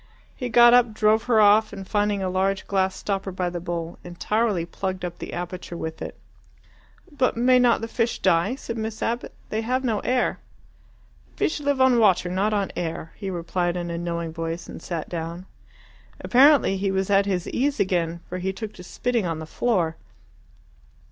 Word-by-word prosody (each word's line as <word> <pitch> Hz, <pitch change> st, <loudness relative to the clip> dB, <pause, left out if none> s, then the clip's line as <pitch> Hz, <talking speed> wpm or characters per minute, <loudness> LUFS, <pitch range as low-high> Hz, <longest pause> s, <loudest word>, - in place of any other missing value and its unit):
He 250 Hz, -2 st, -4 dB
got 240 Hz, +1 st, +7 dB
up, 245 Hz, -3 st, +4 dB
drove 215 Hz, 0 st, +3 dB
her 240 Hz, -3 st, +3 dB
off, 215 Hz, +1 st, +5 dB
and 195 Hz, -2 st, -8 dB
finding 205 Hz, -1 st, 0 dB
a -, -, 0 dB
large 190 Hz, +1 st, 0 dB
glass 190 Hz, -1 st, 0 dB
stopper 195 Hz, -1 st, -3 dB
by 180 Hz, -1 st, -2 dB
the 175 Hz, -, -4 dB
bowl, 170 Hz, -1 st, -5 dB
entirely 195 Hz, +1 st, -1 dB
plugged 185 Hz, +1 st, -4 dB
up 175 Hz, -1 st, -7 dB
the -, -, -6 dB
aperture 175 Hz, 0 st, -6 dB
with 160 Hz, -1 st, -6 dB
it. -, -, -6 dB, 0.9 s
"But 265 Hz, -5 st, 0 dB
may 250 Hz, +1 st, +5 dB
not 245 Hz, -2 st, +3 dB
the 225 Hz, -, -3 dB
fish 230 Hz, 0 st, -1 dB
die?" 175 Hz, +6 st, +2 dB
said 230 Hz, -4 st, -6 dB
Miss 220 Hz, 0 st, -4 dB
Abbott. 235 Hz, +2 st, -2 dB, 0.2 s
"They 220 Hz, -, -1 dB
have 255 Hz, +3 st, -1 dB
no 225 Hz, -5 st, 0 dB
air." 250 Hz, 0 st, 0 dB, 1.0 s
"Fish 310 Hz, -, 0 dB
live 285 Hz, -2 st, 0 dB
on 260 Hz, -2 st, +5 dB
water, 190 Hz, -5 st, +3 dB
not 195 Hz, +4 st, +1 dB
on 200 Hz, -2 st, 0 dB
air," 165 Hz, -1 st, -4 dB
he 195 Hz, -2 st, -5 dB
replied 175 Hz, 0 st, -2 dB
in 175 Hz, -1 st, -4 dB
a 170 Hz, -, -3 dB
knowing 170 Hz, -1 st, -3 dB
voice, 165 Hz, +1 st, -4 dB
and -, -, -9 dB
sat 170 Hz, -3 st, -4 dB
down. 170 Hz, +1 st, -5 dB, 0.7 s
Apparently 270 Hz, -6 st, +5 dB
he 195 Hz, +1 st, -1 dB
was 190 Hz, +1 st, -1 dB
at 200 Hz, 0 st, +4 dB
his 180 Hz, -3 st, -1 dB
ease 280 Hz, +3 st, 0 dB
again, 170 Hz, -3 st, 0 dB
for 180 Hz, -, -5 dB
he 190 Hz, +1 st, -1 dB
took 210 Hz, +2 st, -7 dB
to 180 Hz, -, -11 dB
spitting 235 Hz, +2 st, -1 dB
on 165 Hz, -1 st, -2 dB
the 160 Hz, -, -6 dB
floor. 170 Hz, -3 st, 0 dB
195 Hz, 190 wpm, -24 LUFS, 175-230 Hz, 1.0 s, got